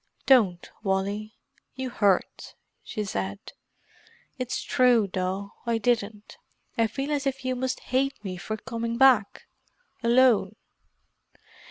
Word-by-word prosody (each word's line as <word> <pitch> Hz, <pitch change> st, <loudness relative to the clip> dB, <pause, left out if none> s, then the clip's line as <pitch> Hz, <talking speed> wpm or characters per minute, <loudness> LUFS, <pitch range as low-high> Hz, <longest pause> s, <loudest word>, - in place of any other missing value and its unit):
"Don't, 205 Hz, -10 st, +4 dB
Wally; 205 Hz, +2 st, -2 dB, 0.4 s
you 260 Hz, -1 st, -4 dB
hurt," 200 Hz, -5 st, 0 dB, 0.3 s
she 215 Hz, -, -4 dB
said. 100 Hz, -, -5 dB, 0.9 s
"It's 255 Hz, 0 st, -3 dB
true, 245 Hz, -5 st, +3 dB
though; 190 Hz, +2 st, -3 dB
I 230 Hz, -1 st, +2 dB
didn't. 215 Hz, -2 st, -2 dB, 0.4 s
I 230 Hz, -1 st, +2 dB
feel 270 Hz, +6 st, -4 dB
as 285 Hz, -2 st, 0 dB
if 270 Hz, -1 st, -3 dB
you 255 Hz, 0 st, 0 dB
must 255 Hz, +1 st, -2 dB
hate 270 Hz, +2 st, 0 dB
me 185 Hz, -1 st, -4 dB
for 215 Hz, +5 st, -5 dB
coming 230 Hz, 0 st, -4 dB
back—alone." 240 Hz, -, +2 dB
230 Hz, 115 wpm, -26 LUFS, 200-255 Hz, 0.9 s, Don't